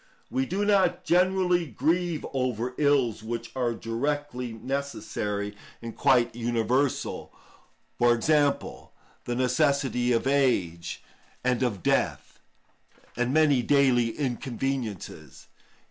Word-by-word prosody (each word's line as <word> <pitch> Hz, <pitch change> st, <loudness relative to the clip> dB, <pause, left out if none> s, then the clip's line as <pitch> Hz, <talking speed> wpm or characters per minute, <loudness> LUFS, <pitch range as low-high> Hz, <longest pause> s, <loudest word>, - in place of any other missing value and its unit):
We 265 Hz, +1 st, 0 dB
do 200 Hz, 0 st, -1 dB
not 185 Hz, -3 st, +2 dB
generally 180 Hz, -1 st, +2 dB
grieve 160 Hz, -, 0 dB
over 125 Hz, -2 st, -1 dB
ills 140 Hz, -7 st, +2 dB
which 115 Hz, +1 st, -5 dB
are 120 Hz, -3 st, 0 dB
directly 125 Hz, +2 st, -3 dB
necessary 110 Hz, -5 st, -4 dB, 0.2 s
and 115 Hz, -1 st, -8 dB
quite 130 Hz, -5 st, +3 dB
universal; 120 Hz, +3 st, -1 dB, 0.7 s
for 120 Hz, 0 st, +5 dB
example, 145 Hz, +3 st, 0 dB, 0.3 s
the 120 Hz, -, -2 dB
necessity 130 Hz, -1 st, +1 dB
of 115 Hz, 0 st, +1 dB
age 90 Hz, -12 st, 0 dB, 0.4 s
and 125 Hz, -1 st, +1 dB
of 110 Hz, -8 st, -1 dB
death, -, -, 0 dB, 0.8 s
and 125 Hz, +1 st, 0 dB
many 145 Hz, -3 st, +4 dB
daily 120 Hz, -3 st, +2 dB
inconveniences. 120 Hz, -, -4 dB
130 Hz, 100 wpm, -27 LUFS, 115-145 Hz, 0.8 s, for